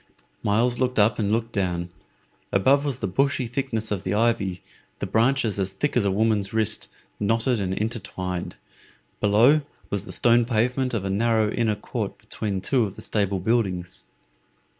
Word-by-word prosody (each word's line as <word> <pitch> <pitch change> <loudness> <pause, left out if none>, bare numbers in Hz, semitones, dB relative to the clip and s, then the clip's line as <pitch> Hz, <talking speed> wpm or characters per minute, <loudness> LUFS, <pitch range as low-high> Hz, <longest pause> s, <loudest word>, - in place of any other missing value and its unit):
Myles 120 +4 +1
looked 125 -1 0
up 105 +1 +3
and 105 -1 0
looked 115 +1 0
down. 90 -3 -2 0.6
Above 135 +9 +3
was 140 -3 -3
the - - 0
bushy 135 +7 +1
thickness 115 -3 -2
of 100 -3 -1
the 95 +1 -2
ivy, 105 -5 0 0.3
the - - -3
branches 115 -2 +1
as 95 0 0
thick 145 +9 -1
as 120 - +3
a - - +3
woman's 105 0 +1
wrist, 110 -2 +2 0.3
knotted 115 +3 +1
and 95 -2 -2
intertwined; 95 -5 -4 0.6
below 115 +9 +5 0.3
was 100 -2 -2
the - - -8
stone 120 0 +4
pavement 125 +2 0
of 100 -3 -2
a 95 - -1
narrow 110 +1 +2
inner 110 -3 +1
court 105 - -5
between 100 -3 -4
two 125 +3 +2
of 100 - -6
the - - -9
stable 100 -2 0
buildings. 95 -4 -1
110 Hz, 165 wpm, -24 LUFS, 100-120 Hz, 0.6 s, below